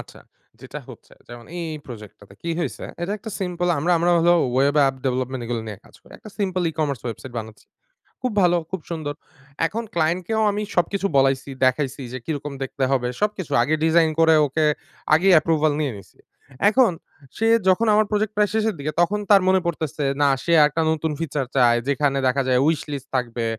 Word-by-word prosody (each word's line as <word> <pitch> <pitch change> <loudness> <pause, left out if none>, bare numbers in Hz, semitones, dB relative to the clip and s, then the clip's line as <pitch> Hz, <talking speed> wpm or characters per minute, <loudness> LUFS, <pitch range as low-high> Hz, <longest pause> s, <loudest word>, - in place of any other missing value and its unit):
আচ্ছা, - - -13 0.4
যেটা - - -8
হচ্ছে - - -14 0.2
যেমন 120 -1 -10
এই, 175 - -4
এই 155 - -6
প্রজেক্টটাতে, 105 -4 -12
কি 170 - -3
হইছে? 150 -7 -4 0.2
এটা 180 +4 -2
একটা 220 - -8
সিম্পল 180 -1 -2
আমরা, 175 +5 +1
আমরা 175 +1 +2
হলো 175 +1 +4 0.2
web 140 +2 +2
app 135 - 0
development 130 0 -2
এগুলো 120 -1 -2
নিয়ে 105 -3 -7
কাজ - - -21
করি। - - -19
একটা 215 - -12
সিম্পল 185 -3 -1
e-commerce 145 -6 -3
ওয়েবসাইট 120 +2 -6
বানাচ্ছি। 110 -1 -10 0.6
খুব 255 -2 -1
ভালো, 175 -1 +4
খুব 190 -3 -4
সুন্দর। 155 -3 -4 0.5
এখন 230 +5 -4
ক্লায়েন্টকেও 175 +6 0
আমি 205 +1 -3
সবকিছু 195 +3 +1
বলাইছি, 135 0 +2 0.2
দেখাইছি 135 +2 0
যে 130 - -3
কি - - -3
রকম 145 0 -7
দেখতে 135 +1 -4
হবে, 125 -2 +1
সবকিছু। 205 -5 -2
আগে 145 +6 +1
ডিজাইন 160 0 +4
করে 160 0 +5
ওকে 155 +3 0 0.5
আগেই 185 +5 +5
অ্যাপ্রুভাল 155 -1 +3
নিয়ে 145 -3 -1
নিছি। 95 -1 -16 0.5
এখন 240 -1 +4 0.5
সে 225 - +1 0.2
যখন 205 +5 +3
আমার 215 +1 +4
প্রজেক্ট 210 0 0
প্রায় 210 -1 +2
শেষের 220 -2 0
দিকে 145 +2 -3
তখন 205 +4 +1
তার 200 -2 +7
মনে 190 0 +4
পড়তেছে 155 -3 -3 0.2
না 145 - +5 0.2
সে 170 - +1
আরেকটা 150 +2 +3
নতুন 160 0 -1
ফিচার 145 -4 -2
চায়। 120 -3 +4
যেখানে 140 -1 +1
দেখা 135 +2 +1
যায় 125 -1 +3
উইশলিস্ট 145 -4 -2
থাকবে, 120 -2 -2
155 Hz, 190 wpm, -22 LUFS, 135-180 Hz, 0.6 s, তার